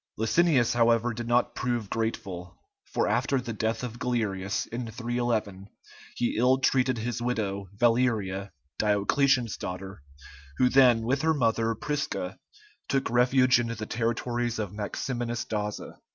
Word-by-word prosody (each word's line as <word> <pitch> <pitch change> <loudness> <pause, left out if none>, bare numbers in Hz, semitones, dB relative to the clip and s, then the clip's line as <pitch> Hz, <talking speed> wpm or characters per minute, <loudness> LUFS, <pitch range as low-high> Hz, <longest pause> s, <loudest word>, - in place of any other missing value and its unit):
Licinius, 125 +2 +3
however, 120 0 +3
did 120 +1 -5
not 120 +1 +2
prove 120 -4 -2
grateful, 95 -5 -4 0.3
for - - -1
after 135 - +1
the 120 -2 -5
death 110 +2 -2
of 120 -1 -6
Galerius, 105 -6 -1
in 115 0 -5
311, 115 -4 -2 0.5
he 120 - -1
ill 125 +3 +4
treated 130 -1 +2
his 120 +1 -3
widow, 100 -5 -2
Valeria, 110 -5 +1 0.3
Diocletian's 115 +4 +2
daughter, 95 -2 -6 0.6
who 125 - +4
then, 125 -4 +5
with 130 +4 0
her 160 0 +2
mother, 115 -3 +1
Prisca, 150 - -3 0.5
took 135 -3 0
refuge 125 +1 +4
in 120 - -1
the 110 -2 -4
territories 120 +1 -1
of 105 -3 -4
Maximinus 120 +3 -3
Daza. 105 -3 -4
115 Hz, 135 wpm, -27 LUFS, 110-125 Hz, 0.6 s, then